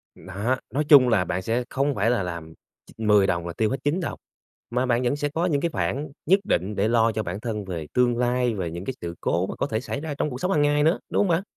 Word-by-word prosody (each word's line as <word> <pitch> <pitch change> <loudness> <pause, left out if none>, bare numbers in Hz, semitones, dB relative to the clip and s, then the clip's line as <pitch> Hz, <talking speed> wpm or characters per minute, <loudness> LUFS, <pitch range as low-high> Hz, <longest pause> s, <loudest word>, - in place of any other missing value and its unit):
Đó, 105 +7 -2 0.2
nói 145 +3 +1
chung 135 -4 +8
là 100 -6 +2
bạn 90 +2 -2
sẽ 115 +5 -1
không 140 +1 0
phải 105 +3 +1
là 120 -5 +1
làm 85 -2 -6 0.4
ch - - -23
10 105 -3 +4
đồng 85 -2 -1
là 85 - -5
tiêu 110 -1 0
hết 135 - -1
9 150 +6 +1
đồng, 165 - -4 0.5
mà 125 +2 0
bạn 120 -1 +1
vẫn 120 +3 +1
sẽ 145 0 -2
có 165 +4 -1
những 145 -6 +1
cái 170 +1 0
khoản 145 0 -2
nhất 190 +5 +5
định 100 - -1
để 100 +2 +1
lo 115 0 +3
cho 110 0 -2
bản 95 +1 -4
thân 105 -3 -4
về 85 -5 -5
tương 120 -1 +2
lai, 125 -1 +1
về 90 -5 -3
những 85 +3 -6
cái 130 - -3
sự 85 0 -5
cố 90 +3 0
mà - - -5
có 140 - -1
thể 110 - -1
xảy 140 - -4
ra 155 -1 -4
trong - - 0
cuộc 125 -2 -7
sống 185 - 0
hàng 155 - +3
ngày 145 0 +3
nữa, 160 +4 +3
đúng - - 0
hông 205 - +3
bạn? 170 +1 +1
120 Hz, 285 wpm, -24 LUFS, 100-145 Hz, 0.5 s, chung